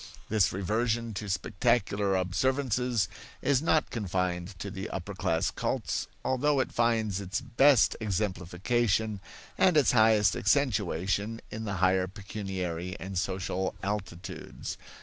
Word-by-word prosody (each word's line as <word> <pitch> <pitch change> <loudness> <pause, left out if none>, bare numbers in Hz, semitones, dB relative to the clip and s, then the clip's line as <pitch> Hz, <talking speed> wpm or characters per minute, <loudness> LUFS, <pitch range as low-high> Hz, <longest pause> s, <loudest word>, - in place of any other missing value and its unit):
This 110 -3 +3
reversion 110 +4 -1
to 105 +1 -5
spectacular 100 -1 +1
observances 125 +2 +1 0.4
is 140 -2 +3
not 160 -1 +2
confined 90 -3 -2
to 100 +3 -5
the 95 +2 -5
upper 95 +2 -5
class 85 -3 0
cults, - - -2 0.2
although 140 +2 +2
it 130 - 0
finds 110 -4 +1
its 100 +1 -2
best 130 +1 +4
exemplification 105 +2 0 0.4
and 180 -4 +5
its 145 - +5
highest 110 -4 +5
accentuation 105 - +1
in 110 +1 -5
the 100 -2 -2
higher 95 0 +2
pecuniary 95 -3 -5
and 95 +1 -6
social 95 0 -1
altitudes. 95 -3 -5
105 Hz, 120 wpm, -29 LUFS, 95-115 Hz, 0.4 s, and